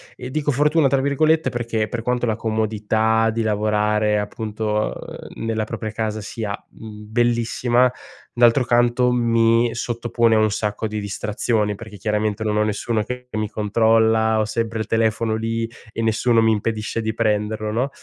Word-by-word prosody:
e 125 +1 -8
dico 150 0 -1
"fortuna", 150 +2 +3
tra 135 0 +2
virgolette, 155 +3 +2
perché 115 -3 -2
per 120 0 -4
quanto 125 +1 0
la 110 -2 0
comodità 110 0 +1
di 115 0 -1
lavorare, 105 0 +1
appunto, 105 +1 -2
uhm, - - -9
nella 110 -1 -1
propria 110 0 -5
casa 110 0 -3
sia, 105 -1 -4 0.2
mhmm, 105 -1 -11
bellissima, 120 +1 +2 0.4
d'altro 120 +2 +4
canto, 120 +1 +3
mi 115 -1 +3
sottopone 120 -1 0
a - - +4
un 110 -1 +2
sacco 105 +1 -2
di 105 0 -4
distrazioni, 105 +1 -1
perché, 105 0 -10
chiaramente, 105 +1 -1
non 105 -1 0
ho 105 - +3
nessuno 105 +1 -1
che 125 +2 -7
mi 110 -1 -2
controlla, 110 +1 +2
ho 110 - +1
sempre 115 +1 -2
il 110 - -2
telefono 110 0 +1
lì 115 +1 -2 0.2
e 115 - -4
nessuno 115 +1 +2
mi 110 - +4
impedisce 110 +1 -2
di 110 0 -2
prenderlo, 105 -1 0
no? 125 +5 0
110 Hz, 165 wpm, -21 LUFS, 110-120 Hz, 0.4 s, d'altro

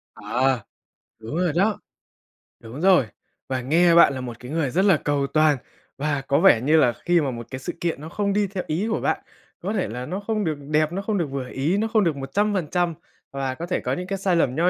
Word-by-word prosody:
À, 130 -2 0 0.6
đúng 110 +7 -6
rồi 180 -2 +1
đó. 200 +4 +2 0.8
Đúng 120 +7 -9
rồi. 185 -9 +5 0.4
Và 130 -1 -1
nghe 170 +6 +4
bạn 170 -4 +7
là 130 - -5
một 120 -2 -7
cái 125 +2 -9
người 155 -4 0
rất 185 +9 +1
là 190 -5 +5
cầu 145 -1 -1
toàn 155 -1 +3 0.4
và 145 -1 -1
có 140 - +3
vẻ 160 -11 +6
như 155 +5 +3
là 125 -6 +4
khi 175 -1 +4
mà 140 -3 -1
một 115 -1 -7
cái 130 - -5
sự 130 - -5
kiện 165 -4 -2
nó 155 - -7
không 200 +3 -1
đi 205 0 +1
theo 190 -1 -4
ý 175 +8 -1
của - - 0
bạn, - - 0 0.4
có 195 +4 -3
thể 195 -4 0
là 125 +3 -5
nó 185 +6 -4
không 215 0 -2
được 155 -3 -1
đẹp, 155 +1 +2
nó 190 +3 -3
không 205 0 -1
được 170 - 0
vừa 135 -2 -4
ý, 150 +8 0
nó 220 +2 0
không 220 -2 +2
được 165 -5 +1
100% 175 +3 0 0.4
và 135 -1 -2
có 170 - -5
thể 180 - -1
có - - -2
những 180 0 -4
cái 195 +1 -2
sai 190 -2 +1
lầm 130 -6 +1
nho 170 +3 +3
160 Hz, 245 wpm, -23 LUFS, 135-190 Hz, 0.8 s, bạn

